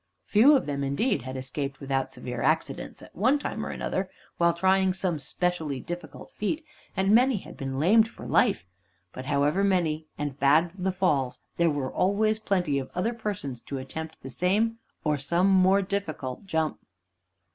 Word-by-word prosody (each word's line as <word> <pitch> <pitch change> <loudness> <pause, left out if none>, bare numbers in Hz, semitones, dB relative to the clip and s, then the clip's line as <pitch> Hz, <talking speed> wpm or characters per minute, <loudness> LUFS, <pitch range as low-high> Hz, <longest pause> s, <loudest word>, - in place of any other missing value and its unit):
Few 250 +8 +6
of 270 - +1
them, 140 -1 -2
indeed, 195 - 0
had 130 0 -6
escaped 130 +1 -4
without 135 -1 -1
severe 125 -1 -5
accidents 155 +5 -1
at - - -15
one 255 +10 +3
time 290 - -4
or - - -4
another, 190 0 -2 0.3
while 170 0 +5
trying 190 +2 +2
some 180 -4 -1
specially 160 -2 -2
difficult 165 0 -8
feat, 305 +10 -3 0.3
and 195 +2 +3
many 250 +1 +5
had - - -10
been 135 -1 -4
lamed 215 +8 +5
for - - -11
life. 90 - +2 0.5
But 130 - -7
however 145 +6 +2
many 165 -5 +1
and 145 -2 -4
bad 155 +5 +4
the 190 0 -1
falls, 150 -9 0 0.2
there 170 -1 +4
were 145 -3 -2
always 215 +3 +2
plenty 180 -9 0
of 130 - -6
other 220 +7 0
persons 195 - -4
to 140 - -6
attempt 160 +4 -7
the 135 - -7
same 210 - +1 0.2
or 150 -2 +1
some 170 +7 +2
more 190 +1 +5
difficult 185 -8 -4
jump. 160 -3 -1
170 Hz, 170 wpm, -27 LUFS, 140-195 Hz, 0.5 s, Few